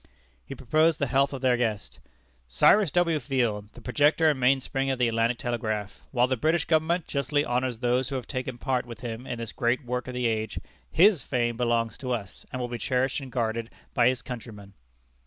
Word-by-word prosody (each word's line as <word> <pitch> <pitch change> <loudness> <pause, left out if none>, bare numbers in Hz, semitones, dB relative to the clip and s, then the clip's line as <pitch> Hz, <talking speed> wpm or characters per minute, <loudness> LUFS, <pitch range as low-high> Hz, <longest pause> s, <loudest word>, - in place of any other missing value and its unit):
He - - -8
proposed 155 +5 +2
the 140 - 0
health 135 +2 +2
of 135 -2 -6
their 125 -2 +3
guest: 110 -4 -2 0.5
"Cyrus 170 - +4
W. 170 0 +2
Field, 120 -7 -1
the 120 - -13
projector 150 +5 +3
and 140 - -4
mainspring 135 +1 +1
of 135 - 0
the 125 -1 +2
Atlantic 115 +1 +1
Telegraph: 110 -4 -3
while 125 -2 +3
the 130 +1 0
British 155 +6 +1
government 165 +1 +1
justly 145 +1 0
honors 125 -1 -1
those 125 +1 +1
who 140 - -3
have 130 - -3
taken 130 -2 -4
part 125 -1 -1
with 120 +1 -9
him 120 +1 -6
in 120 - -4
this 115 -1 -5
great 120 +3 0
work 125 0 -3
of 125 - -6
the 125 -1 -1
age, 110 -2 -1 0.3
his 185 -2 +5
fame 120 -2 -1
belongs 115 -1 0
to 125 -1 -2
us, 100 -6 -6
and 130 - -4
will 125 - -2
be 120 -1 -5
cherished 130 +3 0
and 135 -2 -9
guarded 115 -1 -2 0.2
by 120 -1 +4
his 125 -1 0
countrymen." 110 -5 -9
125 Hz, 205 wpm, -27 LUFS, 115-135 Hz, 0.5 s, his